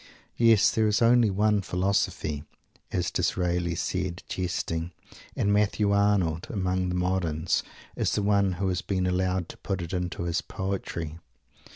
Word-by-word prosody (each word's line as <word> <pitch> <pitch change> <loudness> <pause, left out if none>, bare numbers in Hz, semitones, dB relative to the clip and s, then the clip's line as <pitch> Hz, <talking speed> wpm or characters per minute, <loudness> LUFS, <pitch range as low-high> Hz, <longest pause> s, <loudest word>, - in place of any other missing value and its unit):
Yes, 115 -3 +5
there 110 -1 +2
is 105 -1 +2
only 120 -1 +5
one 105 +1 +2
Philosophy, 90 -5 -1 0.5
as 90 0 -1
Disraeli 90 -1 0
said, 90 0 -2
jesting; 85 -2 -3 0.4
and 100 - +1
Matthew 105 0 +2
Arnold, 100 -5 +2
among 95 -3 -1
the 90 - -2
moderns, 90 -3 0 0.3
is - - 0
the 105 - 0
one 100 -2 +3
who 95 +2 -2
has 90 -1 -1
been 95 -2 -1
allowed 90 -1 0
to - - -10
put 95 -2 -3
it 85 +1 -5
into 90 -1 -2
his 85 0 0
poetry. 85 -4 -4
95 Hz, 150 wpm, -27 LUFS, 90-100 Hz, 0.5 s, Yes